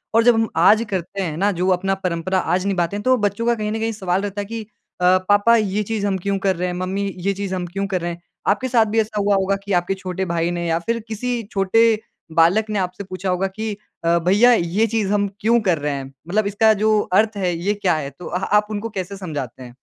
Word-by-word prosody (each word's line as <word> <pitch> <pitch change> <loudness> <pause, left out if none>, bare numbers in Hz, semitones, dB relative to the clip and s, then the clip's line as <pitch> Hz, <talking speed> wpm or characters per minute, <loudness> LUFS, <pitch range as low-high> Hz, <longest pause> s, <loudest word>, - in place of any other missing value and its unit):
और 230 - +5
जब 245 +1 +6
हम 225 0 +2 0.2
आज 215 +5 +6
करते 190 +1 -3
हैं 165 -5 -2
ना 200 +4 +2
जो 180 0 -1
अपना 195 +2 -1
परंपरा 185 +1 0
आज 185 +1 0
निभाते 190 -2 0
हैं 205 - -4
तो 255 +2 +4
बच्चों 205 +1 -1
का 235 0 +3
कहीं 210 -1 -3
ना 220 - -2
कहीं 225 +1 -1
सवाल 190 -3 -1
रहता 205 0 -3
है - - -5
कि 225 +2 -5 0.4
अ, 180 +1 +5
पापा 205 +3 +5
ये 210 -1 0
चीज़ 210 -1 -2
हम 195 -1 0
क्यों 195 +2 -1
कर 195 -1 +1
रहे 180 +2 -2
हैं? 180 - -3
मम्मी 190 +2 -2
ये 195 +3 0
चीज़ 195 -1 -4
हम 180 -1 -3
क्यों 195 +3 -3
कर 185 -2 -2
रहे 175 0 -2
हैं? 170 0 -9 0.3
आपके 235 +6 +2
साथ 235 -3 +3
भी 220 +1 0
ऐसा 215 -1 -1
हुआ 200 0 +2
होगा 195 0 +1
कि 200 0 -3
आपके 175 +2 +1
छोटे 190 0 -4
भाई 170 -1 -1
ने 170 -1 -2
या 165 0 +1
फिर 230 +7 -2
किसी 235 +2 -2
छोटे 195 +3 +3 0.5
बालक 170 +7 +4
ने 210 -1 -1
आपसे 185 +2 -3
पूछा 185 0 -5
होगा 185 +1 +1
कि 215 +3 -4 0.3
अ, 170 +1 +4
भैया 200 +8 +5
ये 200 +2 +1
चीज़ 215 -3 -1
हम 205 -1 +2
क्यों 230 +3 +3
कर 185 -5 +2
रहे 145 0 -1
हैं? 135 -1 -4 0.2
मतलब 205 +3 +1
इसका 220 +2 +4
जो 215 -1 +4
अर्थ 215 +2 +3
है 180 -3 0
ये 190 +5 0
क्या 195 -4 +1
है? 145 -3 -3
तो 140 +6 -13
अ 180 - -2
आप 210 0 +4
उनको 215 +2 -3
कैसे 190 +2 -5
समझाते 145 - -6
हैं? 120 -1 -12
195 Hz, 255 wpm, -21 LUFS, 180-215 Hz, 0.5 s, जब